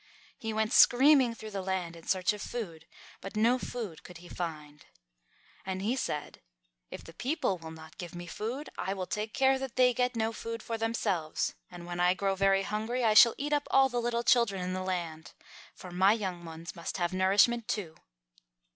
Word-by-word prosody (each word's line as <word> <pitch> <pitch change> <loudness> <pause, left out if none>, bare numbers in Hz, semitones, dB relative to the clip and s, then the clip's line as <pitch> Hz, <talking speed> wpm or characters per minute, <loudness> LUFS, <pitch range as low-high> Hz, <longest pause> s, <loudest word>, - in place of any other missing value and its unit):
He 225 - -3
went 220 +1 0
screaming 260 -2 +6
through 220 -1 -9
the 195 -1 -3
land 185 -3 -3
in 165 - -14
search 185 +1 +2
of 210 - -8
food, 170 -11 -6 0.3
but 195 +2 -8
no 235 +4 +3
food 215 -12 -6
could 180 - -12
he 175 0 -13
find. 150 -4 -7 0.8
And 190 -1 -4
he 230 +5 +1
said, 150 - -4 0.5
"If - - -8
the 165 - -12
people 250 - -1
will 160 -1 -9
not 160 0 -12
give 175 -1 -7
me 175 0 -7
food, 235 - -5
I 195 - -2
will 185 -1 -3
take 210 +3 -3
care 265 +1 +3
that 265 -2 -6
they 250 -1 +5
get 250 0 0
no 225 0 0
food 230 0 -6
for 230 - -3
themselves, 220 -8 -1 0.2
and 175 -1 -10
when 175 0 -5
I 180 +1 +4
grow 195 0 0
very 195 0 +2
hungry 220 +5 -2
I 220 -2 +4
shall 230 +2 +8
eat 295 +2 -2
up 290 0 0
all 270 0 +5
the 245 -1 -1
little 235 0 -1
children 235 -7 +3
in 180 0 -3
the 185 - -3
land. 170 -4 -4 0.4
For 180 - -10
my 190 +3 +4
young 185 -6 -4
ones 165 +2 -8
must 170 +2 -5
have 175 -1 -1
nourishment 205 +5 +3
too." 195 -10 -3
200 Hz, 200 wpm, -30 LUFS, 175-235 Hz, 0.8 s, shall